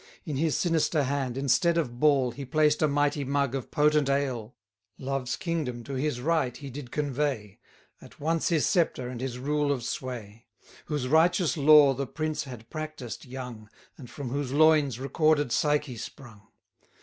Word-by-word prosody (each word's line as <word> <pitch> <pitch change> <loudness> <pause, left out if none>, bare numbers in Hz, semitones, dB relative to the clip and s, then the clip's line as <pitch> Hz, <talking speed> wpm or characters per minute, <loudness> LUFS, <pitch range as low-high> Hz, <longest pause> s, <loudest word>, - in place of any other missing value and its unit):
In 150 - -3
his 155 +1 +1
sinister 165 -3 +1
hand, 135 -2 -2
instead 140 +6 +2
of 125 -7 -2
ball, 140 -4 +4
120 120 +4 -8
He - - -5
placed 150 -1 +3
a 155 - +4
mighty 145 0 +1
mug 140 -1 0
of 135 -3 -4
potent 150 -1 +2
ale; 130 -5 -1 0.4
Love's 135 -2 -2
Kingdom 155 -10 -3
to 140 - -7
his 135 -1 -1
right 150 -4 0
he 140 -2 -8
did 130 -1 -8
convey, 135 -7 -2 0.4
At - - -15
once 160 +2 0
his 160 -4 +2
sceptre 165 -9 +1
and 125 -1 -6
his 130 -2 -4
rule 145 +2 0
of 130 -4 -2
sway; 115 -3 -6 0.4
Whose 150 -4 -2
righteous 170 +4 +3
lore 150 -2 +7
the 135 +1 -3
prince 155 -2 -3
had 120 -4 -10
practised 155 -6 -6
young, 125 -4 -8 0.3
And 125 -4 -12
from 140 -4 -6
whose 140 -1 -2
loins 150 -4 +4
recorded 145 0 +1
Psyche 150 -3 +1
sprung. 115 -3 -10
140 Hz, 170 wpm, -27 LUFS, 125-150 Hz, 0.4 s, lore